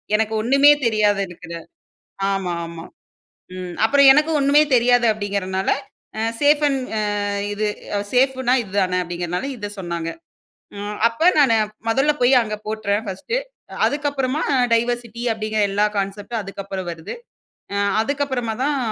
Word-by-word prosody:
எனக்கு 220 0 0
ஒண்ணுமே 275 +5 +6
தெரியாத 210 -2 +2
இருக்குற 170 -1 -11 0.8
ஆமா, 190 -2 -2
ஆமா. 165 0 -9 0.7
ம். 180 -1 -6
"அப்பறம் 280 +1 +6
எனக்கும் 305 +2 +2
ஒண்ணுமே 280 +2 +5
தெரியாது." 245 0 +4
அப்படீங்கறனால, 195 -2 -3 0.5
அ - - -1 0.2
சேஃப் 295 +1 +4
அண்ட் 270 -2 -1 0.2
அ - - 0 0.5
இது 210 +1 -1 0.5
"சேஃப் 260 +1 +3
ன்னா 250 - +3
இது 195 -3 -13
தான." 185 -1 0
அப்டிங்கறதுனால 175 +6 -4
இதை 205 -2 -5
சொன்னாங்க. 170 -3 -4 0.7
அ - - -6 0.3
அப்ப 315 +10 +3
நான் 260 -6 +5 0.3
முதலில் 285 +6 +2
போய் 245 +2 +5
அங்க 215 -1 -4
போட்டுறேன் 215 -1 -1
ஃபர்ஸ்ட்டு 195 - -3 0.5
அதுக்கப்புறமா 285 -1 -1 0.3
டைவர்சிட்டி 235 0 -1
அப்படீங்கற 215 0 -3
எல்லா 205 +1 +2
கான்செப்ட் 200 +4 -4
அதுக்கப்பறம் 195 -2 -6
வருது. 165 -1 -7 0.6
அ-அதுக்கப்பறமா 230 +4 0
தான் 290 0 +1
220 Hz, 130 wpm, -21 LUFS, 195-270 Hz, 0.8 s, ஒண்ணுமே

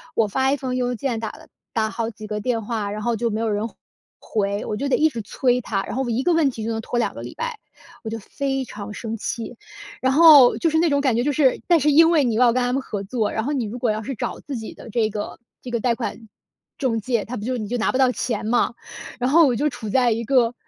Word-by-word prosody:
我 225 - +3
发 265 +6 +1
一 285 - +1
封 255 -1 -3
邮 250 -1 0
件， 245 -1 -2
打 220 - -3
了 - - -13 0.3
打 220 -1 +1
好 230 0 -3
几 215 -1 -10
个 210 0 -3
电 230 0 0
话， 215 -3 -2
然 210 +1 -4
后 235 +2 0
就 230 +1 -1
没 215 0 -2
有 225 -1 0
人 210 +2 -1 0.5
回， 200 -1 -2
我 210 - -3
就 280 +7 -2
得 - - +4
一 315 +1 +4
直 235 -6 -5
催 250 +4 0
他， 195 -4 -2
然 - - -5
后 265 - 0
我 240 - -3
一 235 +3 0
个 350 - +3
问 320 -4 +3
题 225 -3 -7
就 230 - -1
能 225 0 -2
拖 240 - -3
2 - - 0
个 - - -8
礼 - - -8
拜， 475 -2 -4 0.4
我 220 - -4
就 225 - -4
非 270 +5 -3
常 205 -3 -8
生 225 0 -5
气。 230 +3 -5 0.5
然 260 0 +2
后， 295 -5 +8
就 335 - +1
是 320 - +1
那 335 0 +3
种 285 -1 +2
感 265 -5 +2
觉 240 - +1
就 295 - +1
是 270 -2 +2
但 345 -2 +5
是 300 +1 +3
因 325 +3 +7
为 310 -4 +4
你 235 -3 0
要 240 +1 +5
跟 255 - +1
他 245 - 0
们 270 - 0
合 205 -5 -5
作， 215 +1 -1
然 220 - -2
后 285 - -2
你 255 -5 -1
如 215 +4 -6
果 235 -2 +1
要 215 +1 -2
是 265 +4 -4
找 - - -4
自 285 - -6
己 220 -2 -6
的 - - -12
这 220 -1 +1
个 210 0 -5 0.2
这 255 - -8
个 235 - 0
贷 240 +1 +1
款 230 -1 -5 0.5
中 245 -5 0
介， 235 -1 -1
他 250 +2 -5
不 205 - -6
就 255 0 -1
你 215 -3 -4
就 245 +4 -2
拿 220 - +1
不 - - -1
到 260 -1 +4
钱 230 -4 -3
嘛。 240 +1 +1 0.5
然 250 +1 +1
后 330 0 +7
我 250 - +1
就 295 +6 +1
处 225 -5 -7
在 250 +2 +3
一 230 +1 -1
个， 240 -1 +3
240 Hz, 305 characters per minute, -22 LUFS, 220-265 Hz, 0.5 s, 后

